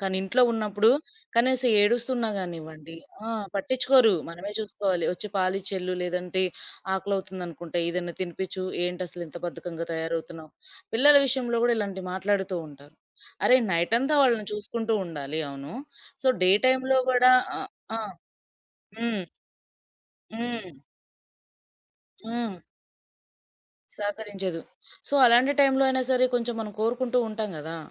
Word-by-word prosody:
కానీ 190 -1 -1
ఇంట్లో 235 +7 +2
ఉన్నప్పుడు 215 -1 +2 0.5
కనీసం 255 +1 +3
ఏడుస్తున్నా 240 +2 +1
గానివ్వండి 165 -3 -7 0.3
ఆ! - - -6 0.3
పట్టించుకోరు. 255 +2 +4 0.2
మనమే 175 +4 -7
జూసుకోవాలి. 200 -5 -1
"ఒచ్చి 195 +4 -5
పాలిచ్చేల్లు, 185 0 -1
లేదంటే 180 +1 -1 0.5
ఆకలవుతుందనుకుంట 185 -4 -5
ఏదైనా 175 0 -2
తినిపిచ్చు. 185 +1 -4 0.2
ఏంటసలు 180 0 -4
ఇంత 155 - -11
బద్ధకంగా 170 -1 -6
తయారవుతున్నావు?" 160 -1 -4 0.4
పిల్లల 290 +5 +7
విషయంలో 250 -2 +1
గూడా 240 -1 +3
ఇలాంటివి 195 -3 -4
మాట్లాడుతుంటారు. 180 -7 -3 0.5
అరె! 255 - +7 0.2
నైటంతా 230 - +2
వాళ్ళని 230 -5 +2
చూసుకుంటుండాలి. 200 -9 -3
అవును. 140 +2 -9 0.5
సో - - +4
డే 185 - +7 0.2
టైమ్‌లో 260 0 +3
గూడా 250 0 +6 0.3
ఆహ్, - - -6 0.3
ఆ! - - -3 1.0
హ్మ్. 230 -4 -2 1.1
హ్మ్. 225 - -5 1.5
హ్మ్. 230 -4 -3 1.4
సహకరించదు. 205 -4 -4 0.5
సో - - -4
అలాంటి 245 +4 +5
టైమ్‌లో 270 -1 +4
అయినా 260 0 +1
సరే 255 0 +4
కొంచెం 240 -1 -1
మనం 210 -1 -6
కోరుకుంటుంటాం 230 -2 -1
గదా! 160 +2 -6
200 Hz, 105 wpm, -26 LUFS, 175-235 Hz, 1.5 s, పిల్లల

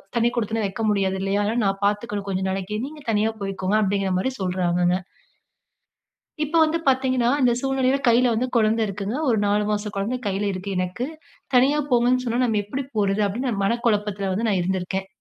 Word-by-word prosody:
தனி 235 0 +3
குடித்தனம் 220 -1 0
வைக்க 205 +3 -6
முடியாது 195 -2 +1
இல்லையா? 195 +1 0
அதனால 225 +4 0
நான் 195 +1 -1
பாத்துக்கணும் 205 0 -1
கொஞ்ச 190 0 -1
நாளைக்கு. 195 +2 -3
நீங்க 300 +1 -10
தனியா 215 +1 +2
போயிக்கோங்க" 195 0 -1
அப்டீங்கிற 195 -1 0
மாரி 260 +8 -1
சொல்றாங்கங்க. 180 -1 +1 1.5
இப்போ 305 +3 -1
வந்து 315 +1 +2
பாத்தீங்கன்னா, 260 -2 +2
இந்த 245 -2 +4
சூழ்நிலையில 270 0 +1
கையில 240 +1 +4
வந்து 245 +3 0
கொழந்த 220 0 +3
இருக்குங்க. 200 +4 -4
ஒரு 225 -3 +3
4 205 +1 +2
மாச 210 0 -1
கொழந்தை 225 +6 -1
கையில 200 +1 0
இருக்கு 190 +2 -5
எனக்கு. 185 +8 -2 0.5
தனியா 270 +4 +4
போங்கன்னு 245 +1 +3
சொன்னவுன 240 +2 +1
நாம 215 -3 +1
எப்பிடி 265 +7 -4
போறது? 200 0 +1
அப்பிடீன்னு 245 +6 -2
நான் 200 -3 -2
மன 230 +4 +1
குழப்பத்துல 205 -3 0
வந்து 225 +5 -1
நான் 190 -3 +2
இருந்துருக்கேன். 190 +1 -2
210 Hz, 180 wpm, -23 LUFS, 195-245 Hz, 1.5 s, இந்த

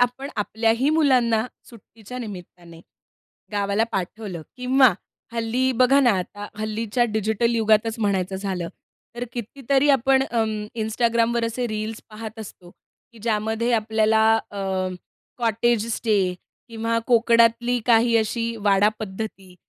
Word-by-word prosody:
आपण 245 +3 0
आपल्याही 225 +5 +1
मुलांना 250 -7 +3 0.2
सुट्टीच्या 230 +1 -11
निमित्ताने, 175 -6 -10 0.7
गावाला 200 +1 +1
पाठवलं 190 -2 -4
किंवा 255 -1 +4 0.4
हल्ली 235 +3 0
बघा 255 +3 +4
ना, 250 -3 +5
आता 205 +3 -6
हल्लीच्या 215 +2 -1
डिजिटल 220 +1 0
युगातच 220 0 +2
म्हणायचं 195 -3 0
झालं 190 -3 -3 0.5
तर 245 - -3
कितीतरी 270 +4 0
आपण 270 0 +3
अं, 220 -2 -1
Instagramवर 230 +1 +1
असे 240 +2 -2
रील्स 215 0 -4
पाहत 220 +1 -8
असतो, 190 -5 -10 0.4
की 230 - -16
ज्यामध्ये 220 +1 0
आपल्याला 220 -1 +2 0.3
अ, 200 - -6 0.8
कॉटेज 230 -1 +1
स्टे, 200 -5 +1 0.3
किंवा 230 0 -1
कोकणातली 235 0 +3
काही 230 0 +4
अशी 230 +1 -1
वाडा 205 -1 +3
पद्धती, 195 -3 -7
225 Hz, 115 wpm, -23 LUFS, 210-240 Hz, 0.8 s, ना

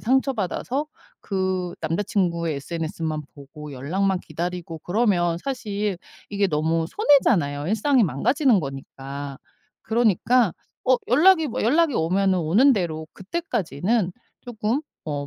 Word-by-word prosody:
상처받아서 260 - 0 0.3
그 185 -2 -2
남자 165 +5 -1
친구의 170 -6 0
SNS만 160 0 -4
보고 145 +1 -10
연락만 180 +8 -1
기다리고 170 0 -5
그러면 175 -4 +1
사실 210 -7 -2 0.3
이게 200 -1 +1
너무 160 0 0
손해잖아요, 170 - +3
일상이 235 +4 +3
망가지는 235 - +2
거니까. 135 0 -7 0.4
그러니까 230 -1 +2 0.3
어 255 -1 +4
연락이 320 +5 +5
뭐 230 - -3
연락이 300 +7 +3
오면은 185 +3 +2
오는 200 - +4
대로 160 -7 -2
그때까지는 200 - -1 0.3
쪼끔 235 +2 -2 0.2
어 145 -2 -3
190 Hz, 295 characters per minute, -24 LUFS, 160-235 Hz, 0.4 s, 연락이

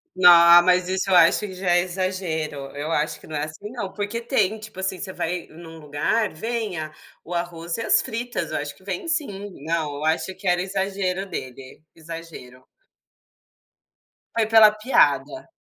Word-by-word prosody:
No 180 -1 +7 0.3
mas 180 0 +3
isso 190 +1 -1
eu 185 - +4
acho 170 -1 +6
que 200 -3 -6
já 185 -1 -1
é 175 0 +4
exagero, 180 -4 -3 0.2
eu 150 +3 -4
acho 150 -1 -1
que - - -15
não 155 - -7
é 150 0 -1
assim 200 +7 -9
não, 210 -6 -5
porque 210 +3 -4
tem, 220 -4 0
tipo 215 -3 -10
assim, 190 -1 -2
você 190 - -5
vai 180 -1 -3
em 170 +2 -13
um 165 0 -11
lugar, 150 +9 -1
vem 220 0 -3
a 155 0 -6 0.3
o 175 - -7
arroz 170 -1 -3
e 230 - -4
as - - +5
fritas 230 -9 -4
eu - - -1
acho 145 0 -5
que - - -22
vem 190 - -5
sim, 210 -12 -2 0.2
não 160 -3 -1
eu 150 - -5
acho 165 +4 0
que 190 0 -8
era 175 0 +2
exagero 190 0 -2
dele, 130 -3 -8
exagero. 160 -6 -10 1.7
Foi 225 -2 +2
pela 220 -1 +7
piada, 215 - +1
180 Hz, 185 wpm, -23 LUFS, 160-205 Hz, 1.7 s, No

